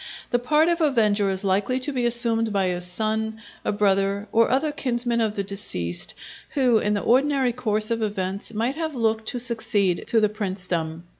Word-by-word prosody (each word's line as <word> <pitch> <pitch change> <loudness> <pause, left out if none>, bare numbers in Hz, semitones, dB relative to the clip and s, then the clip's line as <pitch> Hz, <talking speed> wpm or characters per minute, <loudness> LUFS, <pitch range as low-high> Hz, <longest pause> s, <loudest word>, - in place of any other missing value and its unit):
The 245 - +2
part 300 +6 +2
of 340 0 +1
avenger 215 -9 +2
is 190 +1 -2
likely 200 +6 +1
to 290 +3 -2
be 245 -2 +1
assumed 230 -2 +1
by 200 -1 +1
a 180 -1 -1
son, 220 +4 -2 0.2
a - - 0
brother, 200 0 +1
or 230 0 +3
other 275 +4 +1
kinsman 240 -4 -1
of 215 -2 0
the 200 - -1
deceased, 90 - 0 0.4
who 250 -5 +3
in 210 0 0
the 205 - -1
ordinary 265 0 +2
course 215 -3 -1
of 230 -1 0
events 195 -2 -3
might 230 +4 -1
have 320 -3 -3
looked 220 -2 0
to 245 - -2
succeed 220 -6 +1
to 230 - +3
the 215 - +3
princedom. 180 -6 -3
220 Hz, 190 wpm, -24 LUFS, 200-245 Hz, 0.4 s, or